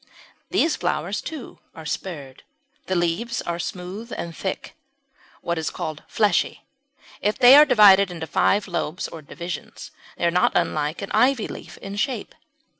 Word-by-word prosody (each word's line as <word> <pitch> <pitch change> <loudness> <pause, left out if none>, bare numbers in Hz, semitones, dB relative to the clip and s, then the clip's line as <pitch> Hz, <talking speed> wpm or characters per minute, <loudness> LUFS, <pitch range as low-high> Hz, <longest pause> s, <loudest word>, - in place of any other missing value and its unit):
These 320 -2 +2
flowers 175 +7 -2
too 310 -7 -8 0.2
are 160 - -10
spurred. 150 -5 -6 0.5
The 185 - 0
leaves 175 +8 -1
are 170 0 -3
smooth 185 +7 -6
and 170 -1 -5
thick 190 - -5 0.7
what 170 -1 -2
is 160 - -2
called 155 -1 -5
fleshy. 205 -5 +1 0.8
They 250 0 +9
are 300 +1 +9
divided 200 -6 +6
into 165 -2 -6
five 200 +6 +2
lobes 175 -1 -3
or 165 - -9
divisions, 170 +3 -7 0.3
and - - -1
are 170 - +3
not - - +3
unlike 155 0 0
an 195 - -6
ivy 255 -3 +3
leaf - - -10
in 195 +1 -6
shape. 240 0 -2
180 Hz, 150 wpm, -23 LUFS, 165-210 Hz, 0.8 s, They